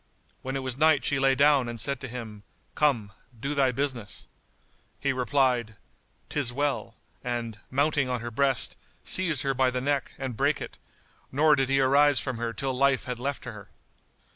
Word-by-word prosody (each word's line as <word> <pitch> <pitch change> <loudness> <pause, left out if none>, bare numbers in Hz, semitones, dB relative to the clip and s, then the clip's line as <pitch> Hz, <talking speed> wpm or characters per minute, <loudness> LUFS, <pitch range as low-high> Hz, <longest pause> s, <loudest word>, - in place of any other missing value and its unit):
When 130 +1 -4
it 135 - -2
was 130 0 -2
night 155 -2 +4
she 140 - +1
lay 135 0 +4
down 140 -3 +4
and 120 -1 -5
said 140 +4 0
to 130 - -6
him, 115 -4 -8 0.3
"Come, 125 -9 +1 0.3
do 140 +5 -2
thy 135 -3 +3
business." 125 -5 -3 0.7
He 140 -1 0
replied, 125 -3 +1 0.5
"'Tis 140 -5 -1
well;" 145 +2 -2 0.3
and, 120 -3 -3
mounting 140 0 +1
on 125 -1 -1
her 120 0 -5
breast, 135 0 +1 0.3
seized 165 -7 +3
her 135 -1 +1
by 130 0 +2
the 125 0 -2
neck 140 0 -1
and 130 -3 -4
brake - - +1
it, - - -8 0.5
nor 150 +3 +4
did 135 -1 0
he 135 0 +3
arise 140 +1 +5
from 130 -3 -3
her 115 -1 -2
till 130 +4 -2
life 135 0 +2
had 125 -2 -5
left 140 +2 -3
her. - - -9
130 Hz, 180 wpm, -27 LUFS, 120-140 Hz, 0.7 s, arise